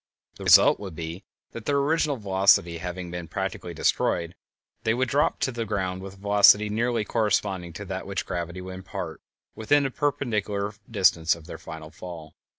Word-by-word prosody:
The - - -8
result - - +7
would 95 -5 -7
be 85 +4 -6 0.3
that, 115 -1 -9
their 145 - +2
original 145 0 +1
velocity 95 -5 +3
having 90 0 -5
been 90 -1 -6
practically 95 -2 -4
destroyed, 85 +2 0 0.5
they 110 - +2
would 130 +1 +1
drop 145 +5 +1
to 130 - +1
the 120 -2 -3
ground 95 -3 -2
with 95 0 -9
a - - -19
velocity 105 +1 +5
nearly 115 +1 0
corresponding 100 -6 0
to - - -7
that - - -5
which - - -3
gravity 85 +1 -4
would 95 0 -7
impart 95 0 -6 0.3
within 145 +6 +2
the 135 - -1
perpendicular 105 -9 -1 0.2
distance 90 -7 +3
of 85 -2 -14
their - - -8
final 80 -1 -9
fall. 80 -2 -9
95 Hz, 175 wpm, -26 LUFS, 90-115 Hz, 0.5 s, result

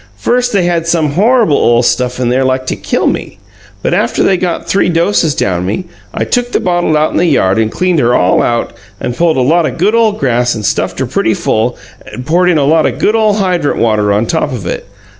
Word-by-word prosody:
"First 245 - 0
they 195 -3 +1
had 170 -1 -1
some 160 -3 +1
horrable 225 - +2
ole 120 +1 +2
stuff 125 +1 0
in 125 -2 0
there 130 +2 +1
like 130 0 -1
to - - -2
killed - - -1
me. - - -7 0.5
But - - 0
after 215 +6 0
they 195 - +3
got 180 -2 -3
three 195 -2 +1
doses 165 -2 +1
down 90 -2 -1
me, 180 - -3 0.3
I - - -2
took 245 -1 -1
the - - +2
bottle 175 -3 0
out 155 +1 +1
in - - -2
the 175 - +2
yard 100 - +2
and 110 -1 0
cleaned 180 -3 0
her 120 -2 +2
all 90 +1 +2
out 120 -1 -1 0.3
and 120 - -4
pulled 165 -2 +1
a - - +2
lot 160 +5 +2
o' - - -3
good 195 +6 0
ole 230 -2 +3
grass 125 - 0
and 105 -2 -5
stuffed - - -1
her - - -1
pretty - - 0
full 115 +3 -1 0.3
and 125 - -8
poured 180 +4 +2
in 170 - +2
a 140 - +1
lot 155 +2 +3
o' - - 0
good 215 - 0
ole 215 -2 +2
hydrant 180 -7 0
water 105 -3 +1
on 105 +3 +1
top 155 +2 -1
of 115 -8 -6
it. 90 - -5
155 Hz, 240 wpm, -12 LUFS, 120-180 Hz, 0.5 s, they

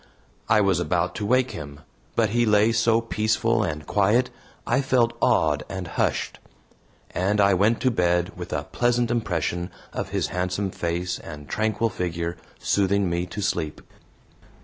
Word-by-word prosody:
I 110 - +5
was 95 -3 +2
about 90 0 0
to 105 - -3
wake 130 +2 +2
him, 70 -1 -8 0.3
but 110 -2 +3
he 120 +1 +2
lay 105 0 +4
so 115 0 +3
peaceful 110 -1 +1
and 75 0 -3
quiet, 110 +6 +2 0.3
I 130 +3 +2
felt 125 -3 +2
awed 75 -1 +3
and 95 -2 -5
hushed. - - -1 0.7
And 100 +3 0
I 100 -1 +5
went 105 +5 +3
to 130 - +3
bed 90 -3 +1
with - - -7
a 75 - -1
pleasant 120 +5 0
impression 90 -6 -1 0.2
of - - -3
his - - -1
handsome 90 +3 -2
face 90 +1 -2
and 75 -3 -9
tranquil 110 +1 0
figure 85 -3 -3 0.2
soothing 100 -2 +1
me 85 +1 -1
to 100 +3 -5
sleep. 80 -5 -1
100 Hz, 155 wpm, -24 LUFS, 85-115 Hz, 0.7 s, I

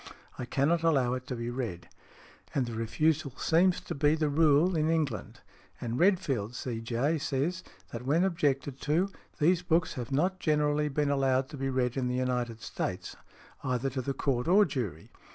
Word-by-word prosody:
I 125 - -3
cannot 150 +7 +1
allow 135 -7 +2
it 130 0 -5
to 125 - -3
be 115 0 -4
read." 115 -9 -4 0.7
And 135 -3 +2
the 120 - -6
refusal 135 +6 0
seems 180 +2 +3
to - - -5
be 145 +2 +3
the 155 -2 0
rule 155 +4 +4
in 155 0 +1
England. 150 - -2 0.4
And 120 +2 -3
Redfield, 150 - +1
C.J., 125 +6 -1
says, 155 +6 -1 0.3
that 115 +1 -6
when 150 +7 +2
objected 140 -7 0
to, 170 +7 +1 0.3
these 170 +3 +3
books 170 -1 +1
have 125 0 -6
not 180 +7 +1
generally 150 -1 +1
been 145 0 0
allowed 135 -1 +1
to 150 - -8
be 135 0 -2
read 130 -1 0
in 130 -2 0
the 125 - -1
United 125 -3 -1
States, - - -4 0.5
either 130 0 -1
to 130 +1 -2
the 135 +2 -3
Court 125 -1 0
or 200 +4 +6
jury. 100 - -4
140 Hz, 175 wpm, -29 LUFS, 125-160 Hz, 0.7 s, or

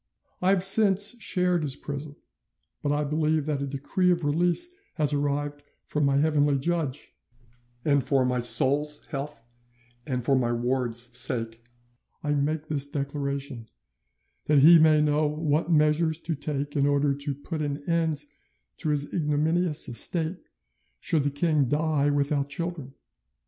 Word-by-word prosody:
I 180 - +2
have 190 -2 +3
since 205 +3 +5
shared 180 -4 +1
his 140 -3 -2
prison, 145 0 -7 0.7
but 145 - -1
I 145 +1 0
believe 155 0 0
that 150 -2 -2
a 140 - -2
decree 145 +7 -1
of 175 -3 +1
release 175 - +1 0.2
has 150 -3 +1
arrived 145 0 -2 0.2
from 150 -1 -1
my 140 0 +2
heavenly 145 -1 +2
judge, 150 -2 -3 0.7
and 140 -3 +2
for 135 -2 +1
my 125 0 0
soul's 145 +5 +1
health 140 -4 -6 0.6
and 125 -4 -3
for 135 - +3
my 120 -2 +1
ward's 120 0 -2
sake 115 -2 -3 0.6
I 145 -1 0
make 150 +2 -1
this 145 -2 -1
declaration, 140 -3 -4 0.8
that 150 - +3
he 165 +4 +8
may 155 -1 +5
know 150 0 +2
what 155 +2 -1
measures 155 +1 +2
to 165 - -3
take 145 -1 -4
in 140 -1 +2
order 145 0 +2
to 140 0 -4
put 155 +3 -6
an 145 -1 -4
end 160 -3 0 0.5
to 155 - -3
his 145 -1 0
ignominious 160 +1 +1
estate 160 - 0 0.5
should 160 - 0
the 145 - 0
king 150 0 +1
die 145 +1 +1
without 145 0 0
children. 150 -3 -5
145 Hz, 150 wpm, -26 LUFS, 140-160 Hz, 0.8 s, he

